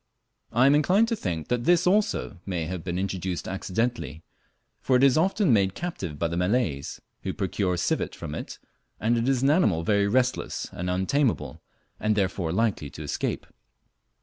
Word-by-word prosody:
I 125 Hz, +3 st, +4 dB
am 140 Hz, -, +6 dB
inclined 185 Hz, +10 st, +4 dB
to 230 Hz, -, +1 dB
think 85 Hz, -, -4 dB
that 120 Hz, -1 st, 0 dB
this 175 Hz, +1 st, +4 dB
also 200 Hz, -, +1 dB
may 90 Hz, -4 st, -3 dB
have 90 Hz, 0 st, -5 dB
been 90 Hz, -1 st, -3 dB
introduced 95 Hz, -2 st, -3 dB
accidentally, 95 Hz, -3 st, -2 dB, 0.6 s
for 130 Hz, -, +1 dB
it 125 Hz, -, +4 dB
is 135 Hz, -2 st, +6 dB
often 185 Hz, -, +3 dB
made 95 Hz, -3 st, +2 dB
captive 95 Hz, -, -5 dB
by 85 Hz, -, 0 dB
the 85 Hz, -, -4 dB
Malays, 90 Hz, -, 0 dB, 0.2 s
who -, -, -3 dB
procure 90 Hz, -3 st, -1 dB
civet -, -, -1 dB
from 75 Hz, -, -6 dB
it, -, -, -6 dB, 0.4 s
and 115 Hz, +2 st, +2 dB
it 115 Hz, +2 st, +1 dB
is 130 Hz, -1 st, +1 dB
an 140 Hz, -, +5 dB
animal 105 Hz, -, +2 dB
very 100 Hz, +2 st, +2 dB
restless 125 Hz, +4 st, 0 dB
and 90 Hz, +1 st, -4 dB
untameable, 95 Hz, -, 0 dB, 0.4 s
and 110 Hz, 0 st, +1 dB
therefore 95 Hz, -4 st, 0 dB
likely 95 Hz, -6 st, 0 dB
to 75 Hz, +2 st, -9 dB
escape. 75 Hz, -, -3 dB
100 Hz, 175 wpm, -26 LUFS, 90-130 Hz, 0.6 s, am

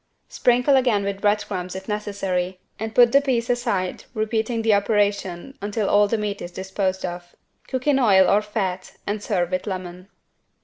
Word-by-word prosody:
Sprinkle 250 Hz, +3 st, +3 dB
again 240 Hz, -6 st, +2 dB
with 200 Hz, 0 st, -3 dB
bread 205 Hz, 0 st, +2 dB
crumbs 185 Hz, -2 st, -5 dB
if 190 Hz, 0 st, -7 dB
necessary 195 Hz, -3 st, -2 dB, 0.2 s
and 220 Hz, +1 st, -5 dB
put 240 Hz, -1 st, +7 dB
the 280 Hz, -, +5 dB
piece 245 Hz, -4 st, 0 dB
aside 230 Hz, -7 st, -2 dB
repeating 220 Hz, +1 st, -1 dB
the 220 Hz, -1 st, +4 dB
operation 205 Hz, +1 st, 0 dB
until 205 Hz, 0 st, -2 dB
all 205 Hz, 0 st, +4 dB
the 230 Hz, -, 0 dB
meat 210 Hz, -1 st, -3 dB
is 175 Hz, -, -6 dB
disposed 190 Hz, +1 st, -2 dB
of. 175 Hz, 0 st, -7 dB, 0.3 s
Cook 260 Hz, -1 st, -3 dB
in 290 Hz, -2 st, +3 dB
oil 195 Hz, -7 st, +5 dB
or 205 Hz, -, +4 dB
fat 195 Hz, -4 st, -3 dB
and 205 Hz, 0 st, -2 dB
serve 180 Hz, -5 st, -1 dB
with 185 Hz, +3 st, -2 dB
lemon. 185 Hz, -1 st, -6 dB
205 Hz, 175 wpm, -23 LUFS, 190-225 Hz, 0.3 s, put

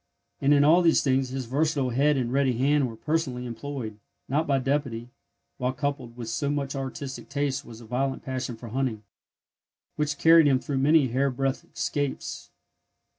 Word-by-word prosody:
And 140 Hz, -, +3 dB
in 145 Hz, -1 st, +6 dB
all 165 Hz, +5 st, +6 dB
these 165 Hz, -2 st, +4 dB
things 130 Hz, -1 st, +1 dB
his 130 Hz, 0 st, -4 dB
versatile 140 Hz, +1 st, 0 dB
head 140 Hz, +4 st, +3 dB
and 125 Hz, -1 st, -1 dB
ready 135 Hz, -2 st, +2 dB
hand 140 Hz, 0 st, +2 dB
were 115 Hz, -, -9 dB
personally 135 Hz, -3 st, -2 dB
employed, 120 Hz, -3 st, -6 dB, 0.3 s
not 150 Hz, +5 st, 0 dB
by 140 Hz, -1 st, +3 dB
deputy; 130 Hz, -3 st, -1 dB, 0.5 s
while 125 Hz, +1 st, 0 dB
coupled 135 Hz, -3 st, -3 dB
with 120 Hz, -2 st, -6 dB
so 115 Hz, +5 st, -1 dB
much 140 Hz, -1 st, -2 dB
artistic 135 Hz, 0 st, -5 dB
taste 140 Hz, -1 st, -1 dB
was 115 Hz, -3 st, -12 dB
a -, -, -11 dB
violent 130 Hz, +3 st, -2 dB
passion 130 Hz, -3 st, -3 dB
for 115 Hz, 0 st, -9 dB
hunting, 120 Hz, -3 st, -2 dB, 0.9 s
which 150 Hz, -2 st, -1 dB
carried 165 Hz, 0 st, +6 dB
him 135 Hz, -2 st, +4 dB
through 135 Hz, +1 st, -3 dB
many 145 Hz, -1 st, +4 dB
hairbreadth 135 Hz, +1 st, -1 dB
'scapes. 145 Hz, -2 st, -3 dB
135 Hz, 170 wpm, -26 LUFS, 125-145 Hz, 0.9 s, in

